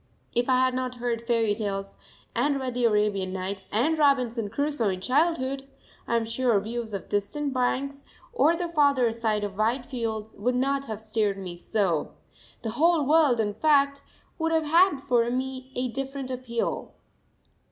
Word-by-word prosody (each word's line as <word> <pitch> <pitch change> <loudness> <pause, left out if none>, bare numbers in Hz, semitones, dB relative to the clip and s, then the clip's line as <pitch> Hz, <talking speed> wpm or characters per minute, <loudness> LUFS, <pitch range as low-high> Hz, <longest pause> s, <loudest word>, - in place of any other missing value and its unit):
If 240 +1 +1
I 255 - +5
had 255 - 0
not 255 0 -2
heard 235 -1 -3
fairy 230 -3 +2
tales 195 -2 -4 0.4
and 275 +4 +1
read 260 -2 -3
the 245 0 +1
Arabian 210 -4 +1
Nights 190 +1 -4
and 255 +10 +2
Robinson 250 -7 +2
Crusoe 285 -2 0
in 185 -1 -2
childhood, 275 - 0 0.4
I 235 - +1
am 230 -1 +1
sure 230 -1 +2
views 225 +2 -5
of 200 -2 -5
distant 260 +8 -2
banks, 275 +2 -1 0.3
or 335 -8 +4
the 350 +1 -2
farther 285 -7 +3
side 220 -2 -1
of 200 0 -5
wide 240 +4 +1
fields, 225 -4 -4
would 245 +4 +1
not 275 +2 0
have 220 -5 -5
stirred 215 -2 0
me 185 -3 -6
so 180 -3 -1 0.5
the 225 - -2
whole 320 +4 +3
world, 295 -5 +4
in 205 -2 0
fact, 280 +1 +3 0.4
would 325 0 0
have 320 -1 +2
had 340 +2 +5
for 240 -3 +2
me 260 +1 -3
a 250 +1 0
different 270 +1 -4
appeal. 245 -2 -3
245 Hz, 170 wpm, -26 LUFS, 220-275 Hz, 0.5 s, I